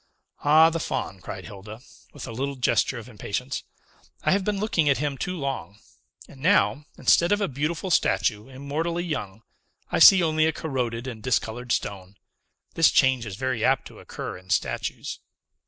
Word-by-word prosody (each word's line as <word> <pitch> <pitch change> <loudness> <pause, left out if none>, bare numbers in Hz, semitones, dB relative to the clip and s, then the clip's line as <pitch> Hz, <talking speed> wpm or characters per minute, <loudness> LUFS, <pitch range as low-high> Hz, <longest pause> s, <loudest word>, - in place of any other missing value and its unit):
"Ah, 155 +3 +6
the 165 - -2
Faun!" 95 -9 -3
cried 95 +1 -7
Hilda, 105 +1 -10 0.3
with 145 - -8
a - - -7
little 135 +4 -3
gesture 125 0 +1
of 115 - -9
impatience; 125 +3 -4 0.6
"I - - +2
have 195 0 +2
been 210 +1 -1
looking 175 -8 +1
at 140 - +3
him 145 0 -2
too 180 +7 -4
long; 135 -8 -4 0.5
and 135 - -15
now, 155 -4 +3
instead 170 +2 +4
of 205 - +3
a 200 - 0
beautiful 155 +6 -3
statue, 110 -8 +1
immortally 155 +6 -3
young, 115 - -5 0.5
I - - +1
see 190 -2 +9
only 155 -1 +2
a 160 - 0
corroded 125 -6 -3
and 120 -4 -7
discolored 120 0 -1
stone. 100 -1 -3 0.6
This 165 -2 +5
change 130 -4 +3
is 100 - -6
very 130 0 -2
apt - - +2
to - - -14
occur - - -7
in 95 0 -21
statues." 100 - -2
135 Hz, 170 wpm, -25 LUFS, 115-160 Hz, 0.6 s, see